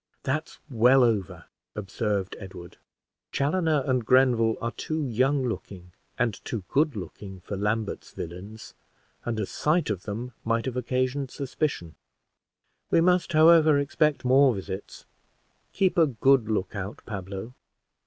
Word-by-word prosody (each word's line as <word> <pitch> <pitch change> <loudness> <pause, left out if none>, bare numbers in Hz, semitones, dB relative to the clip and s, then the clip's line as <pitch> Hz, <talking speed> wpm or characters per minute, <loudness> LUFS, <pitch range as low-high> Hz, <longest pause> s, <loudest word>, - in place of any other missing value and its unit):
"That's 155 +4 -2
well 125 0 +5
over," 110 -6 0 0.3
observed 100 -1 -2
Edward. 95 -3 -10 0.5
"Chaloner 155 0 +1
and 130 -2 +1
Grenville 120 -2 +3
are 115 - -2
too 155 +4 -3
young 130 +3 +1
looking 90 -6 -6 0.3
and 115 -5 -1
too 110 -5 -4
good 145 -1 +2
looking 95 +1 -8
for 100 - -6
Lambert's 105 +2 -2
villains; 100 +6 -8 0.5
and 115 -2 -2
a 105 - 0
sight 155 - 0
of 95 -4 -3
them 115 +4 -5
might 115 0 0
have 130 -2 -3
occasioned 130 +2 -1
suspicion. 135 - -3 1.0
We - - +4
must, 180 0 +2
however, 155 -1 +6
expect 140 0 +1
more 130 -1 +5
visits. 95 0 -7 0.7
Keep 190 -2 +1
a 160 - +6
good 130 -2 +3
look 105 -1 -1
out, 100 +1 -6
Pablo." 100 +2 -6
120 Hz, 135 wpm, -26 LUFS, 105-140 Hz, 1.0 s, however